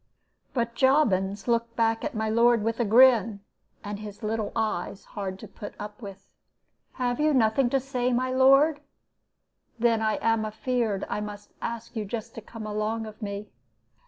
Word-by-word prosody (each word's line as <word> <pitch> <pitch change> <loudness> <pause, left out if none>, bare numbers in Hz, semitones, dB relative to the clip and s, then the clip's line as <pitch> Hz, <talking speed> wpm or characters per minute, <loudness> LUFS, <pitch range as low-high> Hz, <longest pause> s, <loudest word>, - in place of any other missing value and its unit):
"But 235 -1 0
Jobbins 210 -8 +2
looked 235 0 0
back 225 -1 +1
at 300 -4 -3
my 220 0 -1
lord 230 0 +4
with 225 +1 -1
a 235 - +2
grin, 225 -2 +5 0.4
and 205 0 -5
his 210 +1 -9
little 215 -1 -2
eyes, 200 -2 -2
hard 190 -2 -5
to - - -10
put 205 - -9
up 210 +3 -8
with. 195 -3 -10 0.7
'Have 245 +1 -1
you 305 -1 +3
nothing 240 +1 +3
to 270 - +2
say, 250 -1 -1
my 255 +1 0
lord? 275 +4 +5 1.0
Then 230 -1 +2
I 220 -1 +1
am 225 -1 +1
afeared 220 -1 -1
I 210 - -3
must 205 0 -8
ask 230 0 -5
you 220 - -2
just 230 +2 -5
to 225 - -8
come 225 0 -9
along 215 +1 -2
of 215 +1 -11
me.' 200 0 -5
225 Hz, 170 wpm, -26 LUFS, 210-245 Hz, 1.0 s, grin